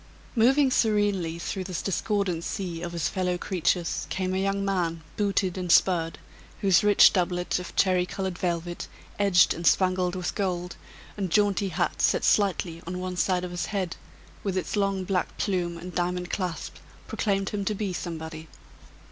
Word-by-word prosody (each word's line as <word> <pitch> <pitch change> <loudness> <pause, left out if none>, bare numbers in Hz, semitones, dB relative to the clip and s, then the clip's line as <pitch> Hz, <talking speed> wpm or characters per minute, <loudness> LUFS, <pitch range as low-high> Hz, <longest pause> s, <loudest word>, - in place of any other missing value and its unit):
Moving 260 +4 +4
serenely 205 -8 +1
through 185 +2 -4
this 180 -3 -4
discordant 195 -2 -1
sea 175 -5 -4
of 175 0 -5
his 170 -3 0
fellow 180 -1 -1
creatures 175 -1 -1
came 185 -1 -1
a 190 - 0
young 195 0 0
man 170 -4 -1
booted 195 -3 0
and 180 -2 -1
spurred, 165 -3 +3 0.4
whose 190 -3 +4
rich 205 -1 +7
doublet 180 -2 0
of 180 - -8
cherry 180 -2 +3
colored 190 -1 -3
velvet, 175 -1 -3 0.3
edged 195 -3 +5
and 170 0 -2
spangled 185 -1 +2
with 180 -1 -3
gold, 180 -3 -2 0.4
and 195 -3 -2
jaunty 200 +1 +2
hat 175 0 -1
set - - +3
slightly 180 -4 +1
on 180 +1 -3
one 185 0 -4
side 180 0 +1
of 180 - -4
his 175 - -3
head, 190 -5 -2 0.5
with 195 -2 -1
its 185 - -2
long 195 -2 0
black 185 -1 -1
plume 175 -4 -1
and 180 +2 -8
diamond 180 0 -2
clasp, 180 -4 -3 0.3
proclaimed 195 -2 -1
him 205 -1 -3
to 210 +2 -1
be 200 -2 -2
somebody. 160 -2 -6
185 Hz, 165 wpm, -26 LUFS, 175-195 Hz, 0.5 s, rich